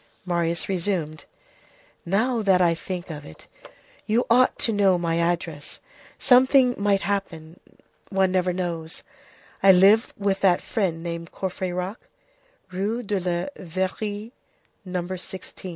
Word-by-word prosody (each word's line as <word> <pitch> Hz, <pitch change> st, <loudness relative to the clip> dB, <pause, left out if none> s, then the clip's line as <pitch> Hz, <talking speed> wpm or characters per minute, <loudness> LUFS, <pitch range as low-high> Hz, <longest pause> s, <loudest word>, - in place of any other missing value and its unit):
Marius 170 Hz, -2 st, -1 dB
resumed:— 170 Hz, -5 st, -2 dB, 0.8 s
"Now 225 Hz, +6 st, +1 dB
that 195 Hz, -3 st, +3 dB
I 175 Hz, -2 st, +4 dB
think 180 Hz, +1 st, -6 dB
of 150 Hz, -2 st, -7 dB
it, 80 Hz, -, -13 dB, 0.6 s
you 230 Hz, +3 st, +2 dB
ought 255 Hz, +2 st, +4 dB
to 225 Hz, -, +1 dB
know 195 Hz, -3 st, +3 dB
my 170 Hz, -1 st, -1 dB
address: 170 Hz, -3 st, -2 dB, 0.4 s
something 255 Hz, 0 st, +5 dB
might 200 Hz, -1 st, +1 dB
happen, 175 Hz, -5 st, -4 dB, 0.5 s
one 190 Hz, -2 st, +2 dB
never 185 Hz, -1 st, +1 dB
knows; 170 Hz, -3 st, -4 dB, 0.6 s
I 195 Hz, -, +8 dB
live 195 Hz, +5 st, +5 dB
with 200 Hz, -1 st, 0 dB
that 185 Hz, -3 st, +4 dB
friend 180 Hz, -8 st, -2 dB
named 170 Hz, -1 st, -5 dB
Courfeyrac, 185 Hz, +1 st, -4 dB, 0.7 s
Rue 205 Hz, +6 st, -2 dB
de 205 Hz, -2 st, -1 dB
la 180 Hz, +8 st, -3 dB
Verrerie, 205 Hz, +5 st, -3 dB, 0.5 s
No. 180 Hz, -2 st, -3 dB
16." 185 Hz, +1 st, -7 dB
185 Hz, 125 wpm, -24 LUFS, 170-205 Hz, 0.8 s, I